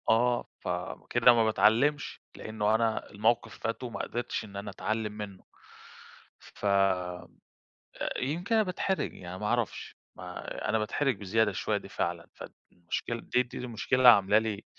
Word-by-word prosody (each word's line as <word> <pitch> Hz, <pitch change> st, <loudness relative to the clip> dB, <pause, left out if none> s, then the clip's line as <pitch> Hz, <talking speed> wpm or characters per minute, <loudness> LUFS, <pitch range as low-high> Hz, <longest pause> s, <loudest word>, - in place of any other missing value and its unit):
آه، 120 Hz, +2 st, +3 dB
فكده 125 Hz, -, +2 dB
ما 115 Hz, -1 st, +4 dB
باتعلمش؛ 135 Hz, +8 st, +2 dB, 0.2 s
لإنه 110 Hz, 0 st, 0 dB
أنا 110 Hz, -1 st, 0 dB
الموقف 115 Hz, +2 st, 0 dB
فات 115 Hz, +3 st, -3 dB
وما 120 Hz, -2 st, -5 dB
قدرتش 120 Hz, -1 st, -3 dB
إن 100 Hz, -2 st, -13 dB
أنا 100 Hz, +1 st, -5 dB
أتعلم 110 Hz, +2 st, -2 dB
منّه، 105 Hz, -3 st, -8 dB, 1.0 s
ف -, -, -11 dB
آآ 95 Hz, -3 st, +1 dB, 0.9 s
يمكن 170 Hz, -, -1 dB
أنا 220 Hz, -, +5 dB
باتحرج 190 Hz, 0 st, -1 dB
يعني، 90 Hz, 0 st, -8 dB
ما 105 Hz, -, -3 dB
أعرفش 120 Hz, -1 st, -2 dB, 0.2 s
ما 90 Hz, -1 st, -6 dB
أنا 110 Hz, -, +2 dB
باتحرج 125 Hz, +4 st, 0 dB
بزيادة 105 Hz, +2 st, +1 dB
شويّة 95 Hz, -, -1 dB
دي -, -, -6 dB
فعلًا، -, -, -3 dB
فالمشكلة 90 Hz, +7 st, -6 dB
دي 125 Hz, -, +1 dB
دي 125 Hz, -, -9 dB
المشكلة 125 Hz, +1 st, -1 dB
اللي 130 Hz, -1 st, +8 dB
عاملة 100 Hz, -2 st, +7 dB
لي 110 Hz, -2 st, -3 dB
110 Hz, 145 wpm, -29 LUFS, 100-120 Hz, 1.0 s, اللي